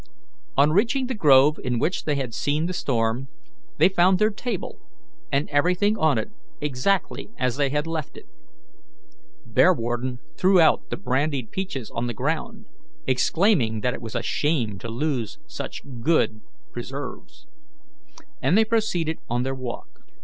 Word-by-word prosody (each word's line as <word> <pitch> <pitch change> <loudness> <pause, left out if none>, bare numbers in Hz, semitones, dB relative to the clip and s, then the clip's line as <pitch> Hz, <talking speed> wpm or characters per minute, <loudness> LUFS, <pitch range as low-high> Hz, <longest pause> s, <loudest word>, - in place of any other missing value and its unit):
On 145 +2 +5
reaching 235 - +2
the 260 - -3
grove 150 - +5
in 125 -2 -1
which 170 +10 -1
they 150 - +1
had 130 -4 -3
seen 150 +6 0
the 180 - -2
storm, 120 -5 -1 0.5
they - - +6
found 185 0 +4
their 215 +3 +3
table 215 -1 -5 0.5
and 140 +2 +1
everything 180 +8 +2
on 155 - +2
it 110 - -3 0.3
exactly 150 +11 -1
as 125 -2 0
they 140 -1 +1
had 150 +2 -1
left 165 -2 -4
it. - - -12 1.2
Bearwarden 120 +2 +2 0.2
threw 185 0 +4
out 160 - +4
the - - -3
brandy 140 -4 0
peaches 135 - -5
on 115 +1 -2
the 120 - -4
ground, - - -3 0.4
exclaiming 130 - +2
that 125 +3 0
it - - -7
was 115 -2 -7
a - - -1
shame 125 -10 0
to 115 - -6
lose 120 -2 -2
such - - -7 0.2
good 115 -6 +2 0.3
preserves, - - -7 1.0
and 185 - +3
they 220 - +5
proceeded 180 -8 0
on 120 +1 0
their 135 +1 -2
walk. 125 - -7
145 Hz, 150 wpm, -24 LUFS, 125-180 Hz, 1.2 s, they